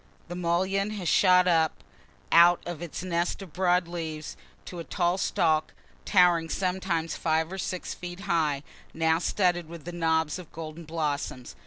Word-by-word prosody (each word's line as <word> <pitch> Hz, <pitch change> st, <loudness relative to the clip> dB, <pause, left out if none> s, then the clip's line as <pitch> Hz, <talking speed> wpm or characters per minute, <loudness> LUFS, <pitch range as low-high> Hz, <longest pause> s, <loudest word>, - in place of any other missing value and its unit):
The 175 Hz, -, -5 dB
mullein 185 Hz, +3 st, 0 dB
has 180 Hz, -4 st, -4 dB
shot 180 Hz, +1 st, +5 dB
up 160 Hz, -3 st, +2 dB, 0.5 s
out 170 Hz, +1 st, +7 dB
of 175 Hz, -2 st, -6 dB
its 175 Hz, 0 st, -6 dB
nest 175 Hz, +2 st, -1 dB
of 175 Hz, -6 st, -13 dB
broad 180 Hz, -1 st, +2 dB
leaves, 160 Hz, -3 st, -5 dB, 0.3 s
to 175 Hz, -, -7 dB
a -, -, -4 dB
tall 175 Hz, +1 st, 0 dB
stalk 160 Hz, -4 st, +1 dB, 0.3 s
towering 175 Hz, -4 st, +4 dB
sometimes 180 Hz, -3 st, -1 dB
five 160 Hz, +1 st, 0 dB
or 190 Hz, -, -5 dB
six 185 Hz, 0 st, -4 dB
feet 175 Hz, +1 st, -8 dB
high, 160 Hz, -7 st, 0 dB, 0.3 s
now 160 Hz, 0 st, +2 dB
studded 175 Hz, -2 st, 0 dB
with 170 Hz, +1 st, -8 dB
knobs 160 Hz, -1 st, 0 dB
of 175 Hz, -, -12 dB
golden 160 Hz, +1 st, -8 dB
blossoms. 150 Hz, -5 st, -3 dB
170 Hz, 155 wpm, -27 LUFS, 160-180 Hz, 0.5 s, out